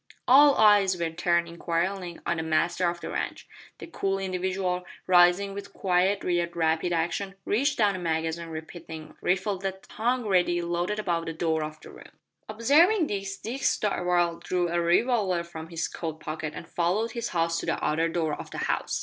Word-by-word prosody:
All 280 +3 +7
eyes 205 -4 +5
were 165 -1 -1
turned 170 +1 +1
inquiringly 170 +1 -2
on - - 0
the - - -1
master 170 +3 +1
of 170 0 -6
the - - -5
ranch. - - -4 0.3
That - - -10
cool 195 -8 -1
individual, 185 -1 -2 0.2
rising 180 +2 +4
with 200 0 -8
quiet 190 +2 +1
yet 175 -1 0
rapid 160 +1 +1
action, 175 +4 -1
reached 280 +8 +1
down 205 -3 +3
a - - -4
magazine 165 0 -2
repeating 160 0 -8
rifle 190 +2 0
that 190 0 -5
hung 240 +2 0
ready 180 -3 +2
loaded 175 +4 -2
above 170 -6 -1
the 165 - -3
door 160 -1 0
of 155 0 -7
the - - -12
room. - - -15 0.3
Observing 310 - +4
this, 195 -4 -4
Dick 245 +7 -6
Darvall 175 -6 +1
drew 180 -1 0
a 170 0 0
revolver 185 0 +2
from 165 -1 -9
his 165 -1 -2
coat 160 -2 -6
pocket 155 0 -5
and - - -8
followed 190 +7 0
his 235 0 -3
host 165 -1 0
to - - -6
the - - -1
outer 165 +2 +1
door 160 -2 -1
of - - -7
the - - -8
house. - - -1
175 Hz, 185 wpm, -27 LUFS, 170-200 Hz, 0.3 s, All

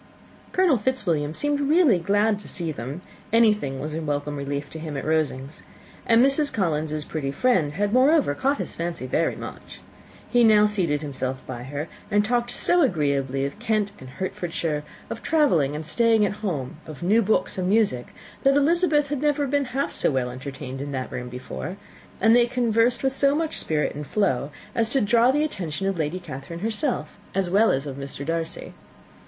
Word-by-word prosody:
Colonel 360 -10 +3
Fitzwilliam 170 - -1
seemed 290 -1 0
really 285 - +4
glad 205 +4 +2
to - - -11
see 170 -3 -4
them: 140 +4 -6 0.3
anything 210 -12 +3
was 150 +1 -4
a 160 - -3
welcome 145 -1 -2
relief 140 0 -4
to 160 - -7
him 155 -3 -5
at - - -4
Rosings; 150 -3 -1 0.5
and 230 +2 +6
Mrs. 280 +1 +2
Collins's 155 -5 -1
pretty 150 -4 -3
friend 165 - +1
had, 205 +4 -1
moreover, 270 - +4
caught 275 - 0
his - - -4
fancy 170 -4 -4
very 165 +6 0
much. - - -9 0.5
He 245 -1 +3
now 215 -2 +6
seated 175 -8 0
himself 130 -2 -4
by 120 -2 -6
her, 145 +4 -4 0.2
and 205 0 +2
talked 240 +1 0
so 350 +8 +3
agreeably 140 - +1
of 140 +9 -6
Kent 215 -3 0
and 130 - -10
Hertfordshire, 165 -1 -3 0.3
of - - -5
travelling 175 - +2
and 155 +1 -5
staying 225 +3 +3
at 205 +1 -3
home, 150 -11 -3
of 155 0 -8
new 210 +6 +4
books 215 -2 +1
and 180 0 0
music, 200 - +2 0.3
that 275 0 +4
Elizabeth 300 -1 +2
had 290 -2 -2
never 295 -1 +1
been 280 +1 0
half 265 +3 -2
so - - +1
well 130 -3 -1
entertained 130 +1 -7
in 140 0 -5
that 130 -1 -4
room 125 0 -5
before; 125 +9 -6 0.4
and 225 +1 +5
they 240 0 +5
conversed 240 0 +2
with 265 0 +2
so 275 +1 +3
much 320 0 -1
spirit 150 -1 0
and 145 0 -7
flow 150 -10 0 0.2
as 225 -1 +1
to 270 - +2
draw 235 +2 +4
the 295 +3 +2
attention 190 - -3
of 195 -3 -1
Lady 160 +4 -1
Catherine 170 +1 -8
herself, 220 - -1 0.2
as 190 -2 0
well 215 +4 +5
as 135 +2 0
of 140 -2 -6
Mr. 140 0 -6
Darcy. 165 +1 -3
185 Hz, 185 wpm, -24 LUFS, 145-240 Hz, 0.5 s, and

